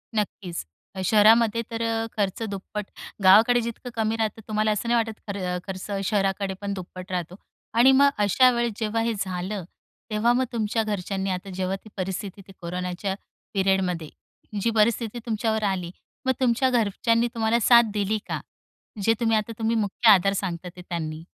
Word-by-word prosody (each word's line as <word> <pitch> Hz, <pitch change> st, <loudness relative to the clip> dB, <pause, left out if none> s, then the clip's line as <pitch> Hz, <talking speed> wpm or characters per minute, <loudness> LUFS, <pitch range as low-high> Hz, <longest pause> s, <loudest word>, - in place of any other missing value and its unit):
नक्कीच. 195 Hz, -4 st, -3 dB, 0.4 s
शहरामध्ये 220 Hz, +3 st, +5 dB
तर 230 Hz, 0 st, -3 dB
अ, 225 Hz, 0 st, 0 dB
खर्च 200 Hz, 0 st, -1 dB
दुप्पट, 200 Hz, +1 st, -5 dB, 0.4 s
गावाकडे 230 Hz, +6 st, +7 dB
जितकं 235 Hz, +2 st, -6 dB
कमी 220 Hz, 0 st, 0 dB
राहतं 220 Hz, 0 st, -2 dB
तुम्हाला 215 Hz, 0 st, +1 dB
असं 210 Hz, +3 st, -2 dB
नाही 240 Hz, -, +3 dB
वाटत 225 Hz, -1 st, -2 dB
खर 200 Hz, -1 st, -4 dB, 0.3 s
खर्च 190 Hz, +1 st, -6 dB, 0.2 s
शहराकडे 195 Hz, -1 st, 0 dB
पण 200 Hz, 0 st, -2 dB
दुप्पट 185 Hz, 0 st, -8 dB
राहतो. 180 Hz, 0 st, -3 dB, 0.4 s
आणि 240 Hz, +3 st, +6 dB
मग 280 Hz, +1 st, +6 dB, 0.2 s
अशा 255 Hz, +6 st, +5 dB
वेळेस 235 Hz, -1 st, 0 dB
जेव्हा 225 Hz, 0 st, 0 dB
हे 230 Hz, 0 st, 0 dB
झालं, 185 Hz, +1 st, -3 dB, 0.5 s
तेव्हा 225 Hz, +3 st, +3 dB
मग 260 Hz, +1 st, +2 dB
तुमच्या 225 Hz, 0 st, 0 dB
घरच्यांनी 195 Hz, -2 st, -2 dB
आता 185 Hz, +2 st, -4 dB
जेव्हा 185 Hz, +1 st, -1 dB
ती -, -, -11 dB
परिस्थिती 190 Hz, +1 st, -4 dB
ती -, -, -12 dB
कोरोनाच्या 180 Hz, +2 st, -3 dB, 0.4 s
पिरियडमध्ये 190 Hz, -5 st, 0 dB, 0.5 s
जी 230 Hz, -, +2 dB
परिस्थिती 230 Hz, +1 st, +1 dB
तुमच्यावर 220 Hz, -1 st, -1 dB
आली, 185 Hz, -4 st, -1 dB, 0.3 s
मग 260 Hz, -, +3 dB
तुमच्या 255 Hz, 0 st, +2 dB
घरच्यांनी 230 Hz, 0 st, +2 dB
तुम्हाला 225 Hz, +1 st, +1 dB
साथ 235 Hz, -1 st, +6 dB
दिली 210 Hz, +1 st, 0 dB
का? -, -, -2 dB, 0.6 s
जे 225 Hz, -, +4 dB
तुम्ही 225 Hz, -2 st, +2 dB
आता 215 Hz, +2 st, -2 dB
तुम्ही 225 Hz, +1 st, +1 dB
मुख्य 220 Hz, +1 st, +2 dB
आधार 195 Hz, 0 st, +5 dB
सांगता 180 Hz, -2 st, -3 dB
ते 180 Hz, -, -10 dB
त्यांनी? 160 Hz, -3 st, -5 dB
210 Hz, 165 wpm, -25 LUFS, 190-230 Hz, 0.6 s, गावाकडे